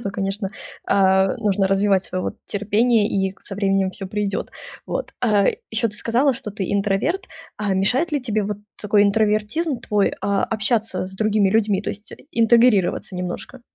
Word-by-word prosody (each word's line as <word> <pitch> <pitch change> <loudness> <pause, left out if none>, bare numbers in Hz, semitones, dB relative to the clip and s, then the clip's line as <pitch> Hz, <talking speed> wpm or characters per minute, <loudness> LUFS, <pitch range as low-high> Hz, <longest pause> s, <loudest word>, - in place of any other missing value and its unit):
то, 200 - -3
конечно, 195 0 -3 0.4
а, 190 +1 +3
нужно 205 -3 +1
развивать 195 0 +2
своё 185 0 -4
вот 215 - -4
терпение, 210 +2 +2
и 195 -1 -1
со 195 - -6
временем 195 -1 +1
всё 195 0 -7
придет. 205 0 -2 0.4
Вот. - - -4
А 210 -5 +3 0.2
ещё 225 +1 +1
ты 210 - -10
сказала, 250 +5 +2
что 215 - -6
ты 195 -3 -4
интроверт. 205 - 0 0.3
А 205 -2 -1
мешает 255 - +1
ли 290 - +1
тебе 215 -4 0
вот 205 0 -3 0.2
такой 210 0 +3
интровертизм 215 +8 +1
твой, 205 -2 +1
а, 200 -1 +1
общаться 220 -3 -1
с 190 - -10
другими 210 -2 +2
людьми, 210 -2 +2
то 210 - -2
есть 210 0 -10
и - - -13
интегрироваться 230 - +3
немножко? 180 +8 -6
205 Hz, 170 wpm, -21 LUFS, 195-225 Hz, 0.4 s, а